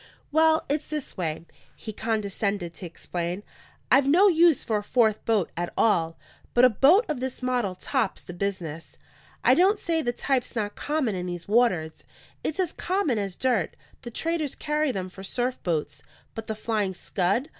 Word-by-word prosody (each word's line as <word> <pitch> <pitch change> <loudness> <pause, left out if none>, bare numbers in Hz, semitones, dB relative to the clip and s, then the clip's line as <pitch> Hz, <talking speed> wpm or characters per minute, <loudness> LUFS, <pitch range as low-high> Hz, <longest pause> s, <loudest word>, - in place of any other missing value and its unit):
"Well, 315 +1 +4
it's 290 +2 -1
this 300 -2 -5
way," 165 -3 -3 0.3
he 215 - -7
condescended 200 -4 -2
to 180 - -7
explain. 175 +3 -4 0.5
"I've 270 +2 +5
no 360 +8 +6
use 335 -4 +4
for 220 - 0
a - - -8
fourth 220 -1 +2
boat 215 -6 +1
at 175 +1 -3
all; 165 -7 +2 0.4
but 245 +1 +7
a 250 - +6
boat 310 - +5
of 300 -5 -2
this 260 0 -5
model 245 -7 0
tops 225 +1 -2
the 175 - -9
business. 175 -4 -4 0.5
I - - +6
don't 385 +4 +4
say 330 -4 0
the 240 - 0
type's 255 +1 -1
not 205 -2 -2
common 290 -7 -1
in 180 -1 -3
these 175 -1 -6
waters; 200 -8 +1 0.4
it's 315 - -3
as 360 -3 0
common 350 - 0
as 195 -3 -3
dirt; 240 -10 0 0.3
the 240 - -7
traders 320 +3 -2
carry 300 -1 0
them 190 -5 -3
for 185 +1 -11
surf 245 +6 -2
boats. 150 -4 -2 0.3
But 225 -1 -7
the 220 - -3
Flying 210 -3 -1
Scud? 200 - 0
225 Hz, 175 wpm, -26 LUFS, 185-285 Hz, 0.5 s, but